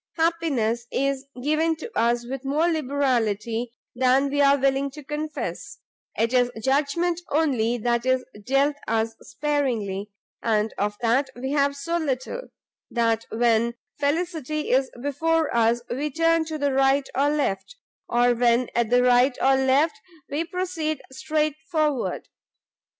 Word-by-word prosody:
Happiness 285 Hz, -9 st, 0 dB
is 275 Hz, 0 st, -1 dB, 0.2 s
given 315 Hz, +3 st, +2 dB
to 330 Hz, +9 st, -8 dB
us 235 Hz, +1 st, +1 dB
with 265 Hz, +2 st, -5 dB
more 295 Hz, +5 st, +1 dB
liberality 245 Hz, -7 st, 0 dB, 0.2 s
than 260 Hz, +2 st, +3 dB
we 285 Hz, 0 st, +2 dB
are 280 Hz, 0 st, +5 dB
willing 275 Hz, +1 st, +1 dB
to 295 Hz, +2 st, -11 dB
confess; 280 Hz, -, -5 dB, 0.4 s
it 230 Hz, +3 st, +1 dB
is 245 Hz, -1 st, +4 dB
judgment 295 Hz, +8 st, 0 dB
only 255 Hz, -7 st, +1 dB
that 235 Hz, +1 st, 0 dB
is 260 Hz, 0 st, +1 dB, 0.2 s
dealt 275 Hz, +4 st, +2 dB
us 225 Hz, 0 st, 0 dB
sparingly, 230 Hz, -10 st, -2 dB, 0.3 s
and 220 Hz, -1 st, +1 dB
of 205 Hz, +1 st, -1 dB
that 250 Hz, +4 st, +2 dB
we 260 Hz, +2 st, -4 dB
have 280 Hz, -1 st, +2 dB
so 335 Hz, +5 st, -2 dB
little, 305 Hz, -, -3 dB, 0.4 s
that 230 Hz, -1 st, 0 dB
when 235 Hz, 0 st, +2 dB, 0.2 s
felicity 305 Hz, 0 st, -1 dB
is 260 Hz, +1 st, +3 dB
before 320 Hz, +1 st, 0 dB
us, 235 Hz, +1 st, +2 dB
we 285 Hz, +5 st, -2 dB
turn 330 Hz, +2 st, +2 dB
to 315 Hz, -1 st, -4 dB
the 285 Hz, -2 st, 0 dB
right 270 Hz, +1 st, +3 dB
or 280 Hz, +2 st, +2 dB
left, 295 Hz, -, -1 dB, 0.3 s
or 245 Hz, +1 st, +3 dB
when 240 Hz, +1 st, +2 dB
at 235 Hz, -2 st, +1 dB
the 245 Hz, +1 st, +4 dB
right 250 Hz, +1 st, +4 dB
or 270 Hz, +1 st, +4 dB
left, 265 Hz, +4 st, +2 dB, 0.3 s
we 295 Hz, +3 st, 0 dB
proceed 335 Hz, -4 st, -3 dB
strait 305 Hz, +2 st, 0 dB, 0.2 s
forward. 305 Hz, -6 st, 0 dB
270 Hz, 140 wpm, -24 LUFS, 240-300 Hz, 0.4 s, are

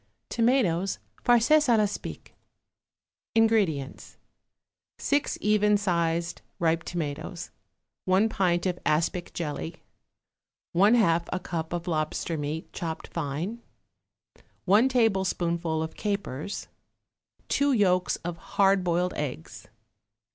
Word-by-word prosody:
=Tomatoes 225 Hz, -7 st, +2 dB, 0.3 s
Farces 245 Hz, +6 st, +5 dB
à 235 Hz, -2 st, +5 dB
l'Aspic.= 210 Hz, -1 st, -3 dB, 1.0 s
INGREDIENTS. 205 Hz, -12 st, +1 dB, 0.8 s
6 290 Hz, 0 st, 0 dB
even 210 Hz, 0 st, +3 dB
sized 170 Hz, -3 st, -1 dB, 0.2 s
ripe 165 Hz, 0 st, +1 dB
tomatoes. 170 Hz, +2 st, -5 dB, 0.5 s
1 190 Hz, +4 st, +4 dB
pint 180 Hz, -5 st, +1 dB
of 180 Hz, -1 st, -1 dB
aspic 170 Hz, +3 st, 0 dB
jelly. 160 Hz, 0 st, -5 dB, 0.9 s
1/2 185 Hz, -4 st, +4 dB
a -, -, -1 dB
cup 165 Hz, -3 st, -4 dB
of 175 Hz, 0 st, -4 dB
lobster 160 Hz, 0 st, -1 dB
meat, 150 Hz, +2 st, -4 dB
chopped 160 Hz, -2 st, -5 dB
fine. 170 Hz, +9 st, -4 dB, 1.0 s
1 210 Hz, +7 st, +5 dB
tablespoonful 180 Hz, -8 st, +1 dB
of 160 Hz, -, -6 dB
capers. 200 Hz, -4 st, -4 dB, 0.8 s
2 285 Hz, 0 st, +2 dB
yolks 185 Hz, -6 st, +2 dB
of 175 Hz, -1 st, -3 dB, 0.2 s
hard 195 Hz, -1 st, +4 dB
boiled 180 Hz, +1 st, 0 dB
eggs. 130 Hz, -, -6 dB
180 Hz, 95 wpm, -27 LUFS, 165-210 Hz, 1.0 s, Farces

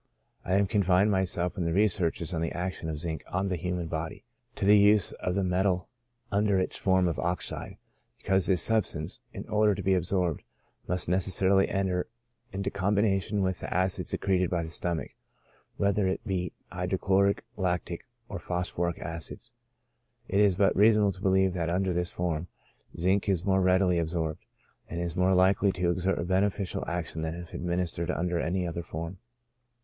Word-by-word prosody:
I 90 Hz, -, -2 dB
have 100 Hz, +1 st, +3 dB
confined 95 Hz, +1 st, +3 dB
myself 90 Hz, -2 st, -1 dB
in 85 Hz, -, -1 dB
my -, -, 0 dB
researches 90 Hz, -2 st, +1 dB
on 80 Hz, -, -1 dB
the 85 Hz, -, -1 dB
action 90 Hz, -2 st, -4 dB
of 80 Hz, -, -3 dB
zinc 80 Hz, -1 st, -4 dB
on 95 Hz, +2 st, -1 dB
the 90 Hz, -, 0 dB
human 90 Hz, 0 st, -3 dB
body, 80 Hz, 0 st, -5 dB, 0.3 s
to -, -, -2 dB
the 105 Hz, +1 st, +7 dB
use 105 Hz, -1 st, +5 dB
of 90 Hz, -, -3 dB
the 100 Hz, -, +1 dB
metal 90 Hz, 0 st, 0 dB, 0.4 s
under 100 Hz, -1 st, +2 dB
its 95 Hz, -, -1 dB
form 95 Hz, -1 st, +2 dB
of 85 Hz, -, -2 dB
oxide, 90 Hz, +1 st, -3 dB, 0.4 s
because 95 Hz, -1 st, +2 dB
this 90 Hz, -3 st, +3 dB
substance, 105 Hz, -4 st, +1 dB
in -, -, -8 dB
order 105 Hz, -1 st, +3 dB
to -, -, -5 dB
be 95 Hz, -, +3 dB
ab 90 Hz, -, +2 dB
sorbed, 90 Hz, -3 st, 0 dB, 0.5 s
must 90 Hz, 0 st, 0 dB
necessarily 95 Hz, +2 st, +3 dB
enter 95 Hz, -2 st, -1 dB, 0.4 s
into 100 Hz, +1 st, -3 dB
combination 100 Hz, 0 st, +1 dB
with 95 Hz, -1 st, -1 dB
the -, -, -6 dB
acid 95 Hz, +1 st, 0 dB
secreted 90 Hz, -2 st, +1 dB
by 85 Hz, -2 st, -1 dB
the 80 Hz, -, -7 dB
stomach, 85 Hz, -6 st, -1 dB, 0.7 s
whether 100 Hz, 0 st, +2 dB
it 95 Hz, -, -2 dB
be 90 Hz, -4 st, -2 dB, 0.2 s
hydrochloric, 95 Hz, +2 st, +1 dB
lactic, 90 Hz, 0 st, -2 dB, 0.2 s
or 100 Hz, -, -6 dB
phosphoric 90 Hz, -1 st, -2 dB
acids. 80 Hz, -2 st, -6 dB, 0.7 s
It 100 Hz, -, +1 dB
is 100 Hz, -3 st, +4 dB
but 100 Hz, +1 st, +3 dB
reasonable 105 Hz, 0 st, +5 dB
to 95 Hz, -, -11 dB
believe 95 Hz, -1 st, +3 dB
that 85 Hz, -2 st, -2 dB
under 90 Hz, +1 st, 0 dB
this 90 Hz, +1 st, -1 dB
form, 85 Hz, -1 st, -2 dB, 0.5 s
zinc 95 Hz, +4 st, +1 dB
is 95 Hz, -2 st, 0 dB
more 95 Hz, -1 st, +3 dB
readily 90 Hz, -1 st, +3 dB
absorbed, 80 Hz, -1 st, -2 dB, 0.4 s
and 85 Hz, -, -4 dB
is 85 Hz, -2 st, -3 dB
more 90 Hz, +1 st, +3 dB
likely 95 Hz, +2 st, +4 dB
to 90 Hz, -1 st, 0 dB
exert 95 Hz, +2 st, 0 dB
a -, -, -2 dB
beneficial 95 Hz, +1 st, 0 dB
action 85 Hz, -2 st, -3 dB
than 80 Hz, +1 st, -3 dB
if 85 Hz, -1 st, -9 dB
administered 85 Hz, -1 st, -2 dB
under 90 Hz, -1 st, -1 dB
any 90 Hz, +2 st, -1 dB
other 85 Hz, 0 st, -4 dB
form. 85 Hz, +2 st, -6 dB
90 Hz, 175 wpm, -28 LUFS, 85-95 Hz, 0.7 s, the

